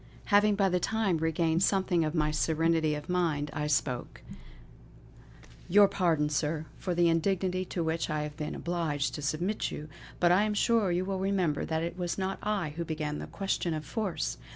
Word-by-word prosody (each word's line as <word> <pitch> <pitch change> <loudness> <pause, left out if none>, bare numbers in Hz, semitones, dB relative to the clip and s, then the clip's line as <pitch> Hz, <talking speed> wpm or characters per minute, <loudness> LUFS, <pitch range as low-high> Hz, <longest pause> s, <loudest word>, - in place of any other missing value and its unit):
Having 205 0 +5
by 195 -1 +3
this 180 -1 0
time 200 -5 +1
regained 160 +1 +1
something 190 -3 +2
of 155 +1 -2
my 150 -1 +2
serenity 160 0 +1
of 150 +1 -7
mind, 165 -5 0
I 150 0 -2
spoke: 140 -4 -1 1.5
"Your 200 +3 +7
pardon, 170 -6 +1
Sir, 150 +1 -1
for 180 -2 -2
the 175 0 +4
indignity 185 +2 +1
to 175 -1 -3
which 160 +1 -1
I 150 -1 -1
have 150 -1 -6
been 150 0 -4
obliged 165 -5 -1
to 150 - -5
submit 170 +8 -1
you; 150 +1 -7 0.3
but 175 -1 +4
I 185 +3 +5
am 210 0 0
sure 220 -3 +2
you 180 +1 0
will 190 0 -2
remember 190 -6 0
that 160 0 -1
it 170 +2 -4
was 175 -1 -2
not 190 0 -2
I 205 -6 -1
who 170 - -1
began 155 -2 -3
the - - -6
question 190 -4 -2
of 155 -1 -5
force. 165 - -3
170 Hz, 190 wpm, -29 LUFS, 155-190 Hz, 1.5 s, Your